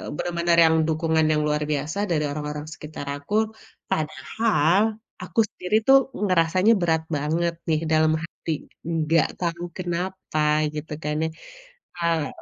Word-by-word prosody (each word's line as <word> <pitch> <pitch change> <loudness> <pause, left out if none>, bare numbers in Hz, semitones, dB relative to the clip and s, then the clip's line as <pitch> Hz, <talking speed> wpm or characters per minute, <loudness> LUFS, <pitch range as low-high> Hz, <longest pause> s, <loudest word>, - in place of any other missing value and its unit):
Bener-bener 170 0 0
yang 160 - +4
dukungan 160 0 +1
yang 150 0 +2
luar 150 0 0
biasa 150 +4 -2
dari 150 -2 +1
orang-orang 150 0 -4
sekitar 150 -1 -8
aku. 145 +8 -8 0.6
Padahal 160 +4 +1 0.4
aku - - -3
sendiri 180 +3 -2
tuh 270 - +9 0.3
ngerasanya 185 +4 +3
berat 160 -2 +2
banget 165 +4 0 0.2
nih 155 -1 +2
dalam 155 0 +4
hati, 165 -1 -6 0.4
nggak 160 +1 +2
tahu 170 -1 -2
kenapa 180 -2 -3 0.4
gitu 155 +1 -6
kan 150 0 -1
ya, - - +1 0.7
eee 165 -4 +1
160 Hz, 130 wpm, -24 LUFS, 150-175 Hz, 0.7 s, tuh